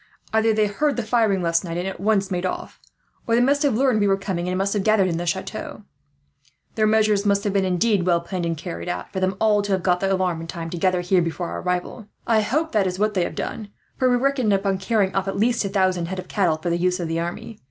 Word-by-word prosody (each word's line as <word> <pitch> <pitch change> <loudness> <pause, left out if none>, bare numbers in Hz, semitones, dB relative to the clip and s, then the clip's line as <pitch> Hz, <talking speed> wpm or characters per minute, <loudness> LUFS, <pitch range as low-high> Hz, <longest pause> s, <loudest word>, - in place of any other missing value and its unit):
Either 220 0 +3
they 215 0 +2
heard 280 +9 0
the 240 - -2
firing 215 -4 +1
last 165 0 +1
night, 170 -2 -4
and 180 +2 -2
at 190 - -6
once 195 -1 +1
made 180 -1 -1
off; 185 - -4 0.5
or 230 - +3
they - - +4
must 280 +4 +3
have 285 -7 +2
learned 255 -2 +2
we 205 - +2
were 195 0 +3
coming, 190 -3 -3
and 185 - -1
must 195 +1 0
have 205 - 0
gathered 215 -3 +3
in 170 -2 -1
the 175 +1 -4
chateau. 190 +4 -4 0.9
Their 215 -1 +2
measures 215 -2 +3
must 200 -1 +2
have 205 - -1
been 195 -1 +2
indeed 190 +2 +1
well 170 -1 +3
planned 175 0 -4
and 165 -1 -2
carried 85 - -6
out, 90 - -5
for 190 - -2
them 185 0 0
all 210 -2 +3
to 200 -1 -1
have 185 -2 -1
got 180 -1 +2
the 195 +1 0
alarm 185 -3 0
in 165 - -7
time 165 -1 -6
to 175 - -4
gather 185 0 +2
here 180 +1 +2
before 170 +1 -3
our - - -5
arrival. 180 +4 -3 0.2
"I 225 -2 +3
hope 305 +10 -1
that 205 -3 +2
is 180 0 -3
what 210 +2 +1
they 185 -3 +1
have - - -6
done, 215 -2 -5 0.3
for 255 - +2
we 245 - +3
reckoned 255 -3 +1
upon 195 -1 +1
carrying 195 -1 +1
off 195 0 -1
at 195 - -2
least 235 +3 +2
a - - -1
thousand 185 -3 +1
head 190 +2 -5
of 185 0 -6
cattle, 180 -6 +1
for 170 +2 -3
the 170 - +1
use 180 +1 +1
of 170 - -2
the 165 +1 -1
army. 210 +6 -5
195 Hz, 275 wpm, -23 LUFS, 180-215 Hz, 0.9 s, they